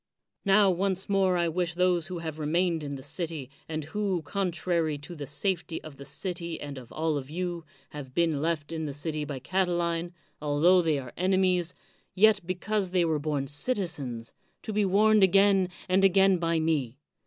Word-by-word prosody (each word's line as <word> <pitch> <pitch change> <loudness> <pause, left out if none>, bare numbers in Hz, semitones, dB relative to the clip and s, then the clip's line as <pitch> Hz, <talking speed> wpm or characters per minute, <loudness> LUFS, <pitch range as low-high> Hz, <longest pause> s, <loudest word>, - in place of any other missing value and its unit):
Now 195 0 +5
once 190 +1 -1
more 190 -2 +2
I 170 -1 +1
wish 170 +1 -1
those 180 -2 +2
who 180 -1 -5
have 160 -2 -5
re 150 - -2
mained 170 0 +1
in 140 -1 -5
the 135 - -9
city, 155 -3 -5 0.2
and 155 -1 -3
who, 185 +2 -2
contrary 170 -2 -1
to 145 +5 -9
the 145 -4 -7
safety 170 +2 -2
of 155 -3 -10
the 140 - -10
city 170 -2 -4
and 145 -2 -6
of 125 - -14
all 160 -1 0
of 135 -1 -6
you, 175 0 -4 0.3
have 135 -3 -9
been 165 -4 +1
left 160 -2 -1
in 160 -1 -3
the 140 -2 -4
city 150 0 -3
by 145 -2 -5
Catiline, 175 +1 -1 0.3
altho 155 +5 +4
they 160 -3 +1
are 130 -3 -7
enemies, 185 -1 +1 0.4
yet 215 +3 +5
because 195 +2 -1
they 180 -1 +2
were 160 -2 0
bom 145 -2 -1
citizens, 145 - -3 0.3
to 215 - -4
be 210 0 +2
warned 210 +2 +4
again 195 0 +4 0.2
and 185 +1 +3
again 195 -1 +5
by 165 -1 +1
me. 145 -6 0
170 Hz, 185 wpm, -28 LUFS, 150-185 Hz, 0.4 s, Now